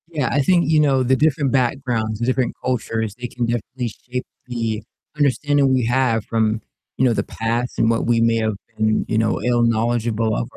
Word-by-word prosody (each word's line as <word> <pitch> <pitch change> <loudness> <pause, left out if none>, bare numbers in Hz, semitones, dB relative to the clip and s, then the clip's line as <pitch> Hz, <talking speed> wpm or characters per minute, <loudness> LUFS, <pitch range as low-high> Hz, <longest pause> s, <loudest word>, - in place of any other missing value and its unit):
Yeah, 150 -7 -1
I 145 - +2
think, 170 +1 +3
you 155 -1 +4
know, 135 -3 +3
the 130 +1 +3
different 145 -1 +1
backgrounds, 120 -4 0
the 120 - -1
different 130 0 0
cultures, 110 -4 -2
they 125 0 -5
can 120 0 -3
definitely 120 +1 -3 0.2
shape 125 0 -3 0.2
the 115 -3 -3 0.3
understanding 145 -1 +2
we 125 -3 +2
have 120 -2 +1
from, 110 -1 0 0.4
you 130 - +3
know, 120 - +3
the - - 0
past 115 +2 -3
and 115 - +3
what 115 0 +1
we 120 -1 +2
may 115 0 +3
have 110 -1 0 0.2
been, 110 0 +1
you 110 - 0
know, 110 0 +1
ill-knowledgeable 115 -2 +1
of - - -3
120 Hz, 195 wpm, -21 LUFS, 115-130 Hz, 0.4 s, you